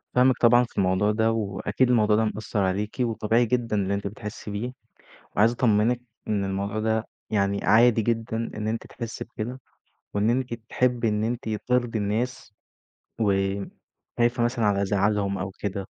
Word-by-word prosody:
فاهمِك 125 0 +5
طبعًا 120 +1 +6
في 120 - -10
الموضوع 95 +2 +2
ده، 110 +1 +2
وأكيد 110 +3 0
الموضوع 110 -3 +4
ده 110 +1 +2
مأثّر 105 0 -3
عليكِ، 100 +2 -1
وطبيعي 115 -1 +2
جدًا 115 -2 0
اللي 100 -1 0
أنتِ 100 0 -2
بتحسي 105 +1 -7
بيه، 115 +5 -4 0.6
وعايز 110 +3 +5
أطمنِك 120 0 +2 0.3
إن 100 -2 0
الموضوع 100 +2 -2
ده 110 +1 0 0.2
يعني 100 -1 0
عادي 115 +1 +5
جدًا 115 0 -1 0.2
إن 105 0 -3
أنتِ 115 +1 -3
تحسي 115 -2 -6
بكده، 120 +2 -6 0.5
وإن 100 +2 +2
أنتِ 125 0 0
تحبي 120 +1 0
إن 105 0 0
أنتِ 115 0 -2
ترضي 120 +1 0
الناس 110 +3 -2 0.7
وخايفة 100 +4 -1
مثلًا 120 -1 0
على 100 -1 +2
زعلهم 100 0 +1
أو 95 +1 -3
كده، 100 -1 -3
110 Hz, 155 wpm, -25 LUFS, 100-120 Hz, 0.7 s, طبعًا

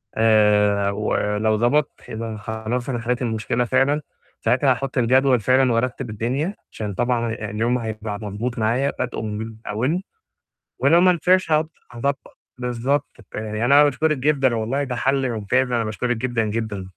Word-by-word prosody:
آآ 105 -2 +3
ولو 105 +1 0
ضبط 130 +6 +2 0.2
يبقى 115 +1 -5
أنا 110 - -6
خلاص 110 +4 -4
أنا 120 -3 -1
حلّيت 120 +2 -2
المشكلة 115 0 -1
فعلًا، 135 +4 +2 0.4
ساعتها 130 +4 +3
هاحُط 135 +3 -2
الجدول 130 +1 +4
فعلًا 130 +3 +3
وارتّب 125 +1 -1
الدنيا 130 - -2 0.2
عشان 105 -2 -5
طبعًا 120 +2 0
آآ 105 -2 -5
اليوم 120 +4 0
هيبقى 110 -2 -5
مضبوط 110 +4 -4
معايا 120 +6 +1
بادئه 125 -3 -2
من 110 +1 -5
أوّله، 130 - 0 0.8
ولو 160 +6 +5
ما 185 0 +6
نفعش 180 0 +2
هاض 155 +1 +2 0.2
هاضبّط 135 +3 -3 0.2
بالضبط 125 +3 -2 0.2
ب - - -7
يعني 110 +1 -2
أنا 140 +3 +7
باشكُرِك 150 +2 +1
جدًا 135 -3 +2
والله 120 +6 -1
ده 130 -3 -3
حَل 135 +1 +1
ممتاز 125 +4 0
أنا 120 -1 +1
باشكُرِك 115 +3 -2
جدًا، 120 -1 -1
جدًا. 105 -2 -3
120 Hz, 160 wpm, -22 LUFS, 110-135 Hz, 0.8 s, أنا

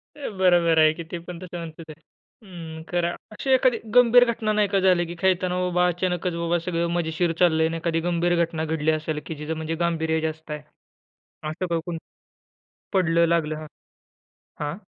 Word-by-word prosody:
अ, 290 - -5
बरोबर 175 -3 +4
आहे 155 0 +6
की. 170 +1 -7
ते 175 - -3
पण 175 -1 -7
तसं 180 -1 -7
म्हणतच 165 -1 -8
आहे. 155 +1 -11 0.4
हं, 165 -4 -9
खरं 175 -1 -1 0.2
अशी 215 +5 -6
एखादी 255 -2 +4 0.2
गंभीर 245 0 +7
घटना 220 -2 -2
नाही 210 -1 +2
का 195 0 +1
झाली, 185 -2 +3
की 170 +1 -7
खेळताना 180 -1 +1
बाबा 180 0 +2
अचानकच 180 0 -1
बाबा 170 +1 0
सगळं 170 -1 0
मजेशीर 165 +1 0
चाललंय 160 -2 +4
आणि 165 - -3
एखादी 165 0 -1
गंभीर 175 0 +1
घटना 160 -1 -4
घडली 160 0 0
असेल 155 0 -2
की 160 - -5
जिचं 150 +2 -4
म्हणजे 160 +1 -3
गांभीर्य 160 -1 0
जास्त 160 0 -4
आहे 150 - -3 0.9
असं 170 +4 -3
का 170 -1 0
कोणी 170 -2 -4 1.0
पडलं, 170 -3 +3
लागलं? 160 -2 +1
हां, 155 0 -8 0.9
हां. 150 +2 -3
170 Hz, 180 wpm, -24 LUFS, 160-180 Hz, 1.0 s, गंभीर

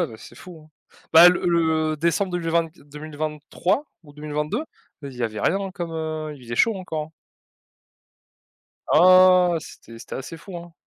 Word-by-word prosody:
ouais 170 - 0
mais 110 - -11
c'est 120 - -14
fou, 165 +1 -13
hein! 155 - -27 0.4
Bah, 170 +2 +10
le 180 - 0
le 160 -2 +1
décembre 170 +5 0
2020-2023 155 - -3 0.2
ou 145 - -16
2022 150 - -4 0.4
bah 140 - -7
z - - -13
il - - -12
y - - -3
avait 110 -2 -4
rien 195 +1 0
comme, 175 -3 -6
heu 155 -1 -4
il 135 - -15
faisait 115 0 -6
chaud 230 - +3
encore. 160 -4 -5 1.8
Ah! 185 +1 +6
C'était 115 -6 -13
c'était - - -9
assez 135 +5 -7
fou, 175 +3 -10
hein. 170 0 -10
160 Hz, 165 wpm, -23 LUFS, 150-175 Hz, 1.8 s, Bah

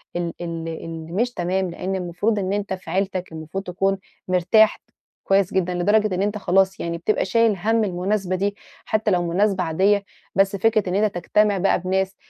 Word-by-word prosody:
ال 170 -1 -2
ال 165 -1 -4
اللي 165 0 -7
مش 240 +7 0
تمام. 185 0 -1
لأن 185 +3 -3
المفروض 190 +4 -1
إن 190 0 -1
أنتَ 205 -1 -2
في 185 - -8
عيلتك، 190 -2 -1
المفروض 160 +4 -6
تكون 195 +1 0 0.3
مرتاح 185 +4 +4 0.5
كويِّس 195 -1 +3
جدًا، 180 -1 +1
لدرجة 205 +3 +2
إن 185 - -1
أنتَ 205 +1 0
خلاص 190 0 +2
يعني 170 0 -3
بتبقى 175 +6 0
شايِل 230 -3 +3
هَمّ 220 +4 +1
المناسبة 190 0 -1
دي، 200 +2 -1 0.3
حتى 215 -1 0
لو 175 -1 +2
مناسبة 190 +2 +1
عادية. 195 +5 +2 0.3
بس 195 +1 +3
فكرة 215 -1 +2
إن 180 - -1
أنتَ 210 -1 +1
تجتمَع 205 +3 +2
بقى 190 +1 +2
بناس، 190 +1 -1
190 Hz, 180 wpm, -22 LUFS, 180-205 Hz, 0.5 s, مرتاح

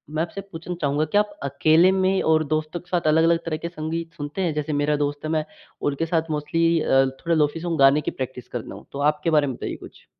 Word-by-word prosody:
मैं 160 - +1
आपसे 185 +4 -6
पूछना 180 -2 -7
चाहूँगा 145 +1 +1
क्या 205 +7 +3
आप 210 - -4
अकेले 155 +6 +4
में 190 0 +2
और 155 0 +3
दोस्तों 155 +3 -2
के 175 - -21
साथ 175 -3 0
अलग-अलग 165 +2 +4
तरह 160 -2 -2
के 170 - -5
संगीत 165 0 -5
सुनते 145 +5 -5
हैं? 170 -4 0
जैसे 150 0 -2
मेरा 145 +1 +1
दोस्त 145 0 -1
है, - - -2
मैं 155 -1 0 0.4
उनके 145 +3 0
साथ 165 -1 -1
मोस्टली 165 +3 +1
अ, 135 -2 +4
थोड़ा 135 +6 -2
लोफी 150 +1 +1
सॉन्ग 165 -2 -3
गाने 135 +2 +6
की - - -3
प्रैक्टिस 130 -1 -6
करता - - -6
हूँ - - -12
तो 140 - -6
आपके 150 +2 -3
बारे 150 -3 +3
में 130 - -3
बताइए - - -5
कुछ? - - -14
155 Hz, 240 wpm, -23 LUFS, 145-165 Hz, 0.4 s, गाने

